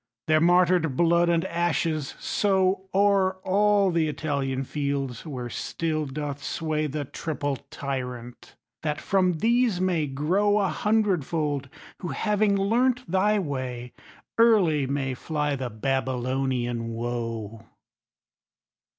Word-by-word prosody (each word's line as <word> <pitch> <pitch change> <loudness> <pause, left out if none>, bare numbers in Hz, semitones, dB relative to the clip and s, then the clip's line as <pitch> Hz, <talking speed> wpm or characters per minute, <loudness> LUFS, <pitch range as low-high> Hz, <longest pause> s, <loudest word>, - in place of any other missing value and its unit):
Their 155 0 +3
martyred 175 -4 +3
blood 170 0 +4
and 170 +1 +2
ashes 165 -4 -1
sowO'er 190 0 +2
all 200 0 +3
the 165 -2 +1
Italian 140 -3 -2
fields, 140 -2 -3
where 125 -5 -5
still 155 +5 -2
doth 145 0 -5
swayThe 155 -3 -2
triple 145 -3 -3
Tyrant; 125 -3 -6 0.3
that 150 -1 -2
from 185 -2 +2
these 230 +2 +2
may 175 -5 +1
growA 190 +8 +1
hundredfold, 165 -9 0 0.3
who, 180 - -5
having 210 +2 +1
learnt 240 +2 +1
thy 205 +3 +3
way, 130 -8 -4 0.5
Early 185 - +4
may 135 -1 -1
fly 150 +1 -2
the 130 -2 -4
Babylonian 130 0 -1
woe. 115 -2 -4
155 Hz, 105 wpm, -26 LUFS, 135-190 Hz, 0.5 s, blood